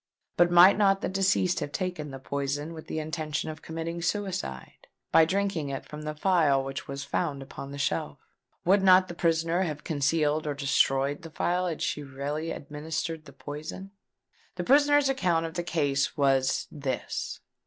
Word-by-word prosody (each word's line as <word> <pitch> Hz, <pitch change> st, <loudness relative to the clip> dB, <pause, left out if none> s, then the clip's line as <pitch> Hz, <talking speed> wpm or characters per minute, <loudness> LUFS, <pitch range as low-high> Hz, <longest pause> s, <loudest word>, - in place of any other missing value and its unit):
But 175 Hz, 0 st, +5 dB
might 175 Hz, +4 st, +7 dB
not 195 Hz, -1 st, +4 dB
the -, -, -1 dB
deceased 190 Hz, -1 st, +2 dB
have 145 Hz, -, -4 dB
taken 180 Hz, -5 st, -3 dB
the 135 Hz, -, -7 dB
poison 140 Hz, +3 st, -3 dB
with 160 Hz, -1 st, -10 dB
the -, -, -4 dB
intention 155 Hz, 0 st, -3 dB
of 155 Hz, -, -11 dB
committing 165 Hz, +1 st, -5 dB
suicide, 175 Hz, -, -4 dB, 0.2 s
by 160 Hz, -, +7 dB
drinking 190 Hz, -4 st, -1 dB
it 135 Hz, -, -5 dB
from 150 Hz, 0 st, -8 dB
the 150 Hz, 0 st, -4 dB
phial 150 Hz, -6 st, +3 dB
which 135 Hz, 0 st, -6 dB
was 140 Hz, 0 st, -5 dB
found 140 Hz, -1 st, -2 dB
upon 135 Hz, +1 st, -9 dB
the 140 Hz, -, -7 dB
shelf? 135 Hz, -13 st, -1 dB, 0.5 s
Would 195 Hz, +3 st, +5 dB
not 185 Hz, -1 st, +6 dB
the -, -, -5 dB
prisoner 165 Hz, +1 st, +1 dB
have 150 Hz, -5 st, -3 dB
concealed 150 Hz, 0 st, +1 dB
or 145 Hz, -, -1 dB
destroyed 140 Hz, 0 st, +1 dB
the 165 Hz, -, -9 dB
phial, 180 Hz, +3 st, 0 dB
had 165 Hz, -1 st, -3 dB
she 170 Hz, -3 st, -1 dB
really 145 Hz, +3 st, -4 dB
administered 155 Hz, +2 st, -4 dB
the 140 Hz, -, -13 dB
poison? 155 Hz, +6 st, -7 dB, 0.6 s
The 180 Hz, -, -3 dB
prisoner's 290 Hz, +4 st, +5 dB
account 180 Hz, -11 st, +1 dB
of 165 Hz, -, -5 dB
the 175 Hz, -, -2 dB
case 145 Hz, -5 st, 0 dB
was 135 Hz, -2 st, +2 dB
this. 140 Hz, -3 st, -4 dB
155 Hz, 175 wpm, -28 LUFS, 145-175 Hz, 0.6 s, might